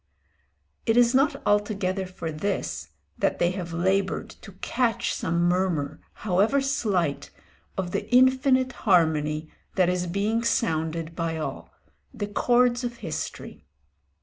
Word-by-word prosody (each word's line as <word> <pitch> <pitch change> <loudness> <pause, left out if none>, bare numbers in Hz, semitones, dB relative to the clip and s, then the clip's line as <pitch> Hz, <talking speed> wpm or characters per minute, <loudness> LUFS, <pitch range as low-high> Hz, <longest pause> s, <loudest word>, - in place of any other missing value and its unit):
It 225 +1 +3
is 240 0 +5
not 275 +3 +3
altogether 200 -2 0
for 170 -3 -5
this 195 +7 -3 0.3
that - - +1
they 175 - +2
have 180 -2 -5
laboured 190 +3 0
to 200 - -12
catch 235 +4 -1
some 170 +1 0
murmur, 175 -5 0 0.3
however 205 +8 +3
slight, 205 - 0 0.5
of 185 -2 -2
the 205 - -3
infinite 260 +1 +4 0.2
harmony 155 -3 +2 0.2
that 185 -2 +3
is 180 0 -1
being 210 +6 0
sounded 165 -6 -1
by 165 -1 -2
all, 155 - -5 0.4
the 205 - -4
chords 245 +4 +2
of 240 -1 -3
history. 155 - -6
190 Hz, 125 wpm, -26 LUFS, 170-235 Hz, 0.5 s, is